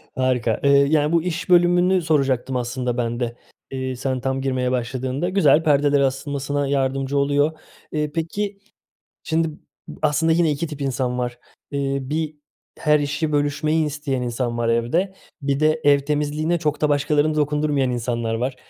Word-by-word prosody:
Harika, 125 -4 +1
eee, 140 - +4
yani, 145 +2 +4
bu 170 -1 +2
iş 170 0 -3
bölümünü 175 +1 +4
soracaktım 135 -5 +1
aslında 125 0 -2
ben 120 0 -1
de, 120 -1 -2 0.4
eee, 130 -1 -3
sen 130 0 -2
tam 135 +1 -1
girmeye 130 -2 0
başladığında. 130 +5 -2
Güzel, 165 -5 +4
perdelere 145 -2 +3
asılmasına 140 +1 -2
yardımcı 135 0 0
oluyor. 145 +3 +1 0.3
Eee, 150 -1 -1
peki 200 +5 -3 0.6
şimdi 160 0 0 0.5
aslında 155 +2 +2
yine 165 -1 +3
2 150 +3 -2
tip 150 -2 -8
insan 130 -2 -1
var, 120 -1 -3 0.3
ııı 135 -1 -2
1 155 0 -2 0.4
her 150 0 +3
işi 145 +2 -1
bölüşmeyi 150 +2 +1
isteyen 145 -3 -3
insan 120 0 -2
var 120 -1 0
evde, 120 +12 +1 0.3
1 140 0 0
de 155 +1 +2
ev 145 -1 +5
temizliğine 150 +3 -1
çok 150 -2 -1
da 150 - +2
başkaları 150 +1 +2
dokundurmayan 150 -3 +1
insanlar 120 -1 -2
var, 125 +3 -2
145 Hz, 155 wpm, -22 LUFS, 130-155 Hz, 0.6 s, ev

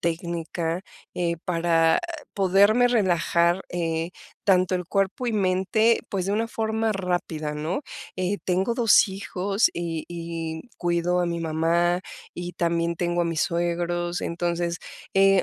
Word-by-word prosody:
técnica, 170 +1 -2 0.3
eh, 170 -1 0
para 165 -2 +3 0.4
poderme 200 +5 +4
relajar, 175 -4 +2
eh, 165 -1 -1 0.3
tanto 185 -1 +3
el 180 -1 -2
cuerpo 195 +7 0
y 235 - 0
mente, 200 +3 +2
pues, 190 -3 -1
de 200 - 0
una 225 +2 0
forma 220 0 0
rápida, 175 -5 -2
¿no?, 160 - -2 0.3
eh, 185 +2 -1
tengo 190 +5 +1
2 230 -4 +5
hijos 195 +2 0
y 170 -1 -3
y 165 -1 -5 0.2
cuido 175 0 +1
a 175 - +1
mi 170 0 -2
mamá, 165 +2 +1 0.3
y 175 0 -5
también 170 -1 0
tengo 175 0 0
a - - 0
mis 165 -2 -1
suegros, 175 0 -1
entonces, 170 0 -2 0.4
eh, 195 -1 +5
175 Hz, 135 wpm, -25 LUFS, 170-195 Hz, 0.4 s, 2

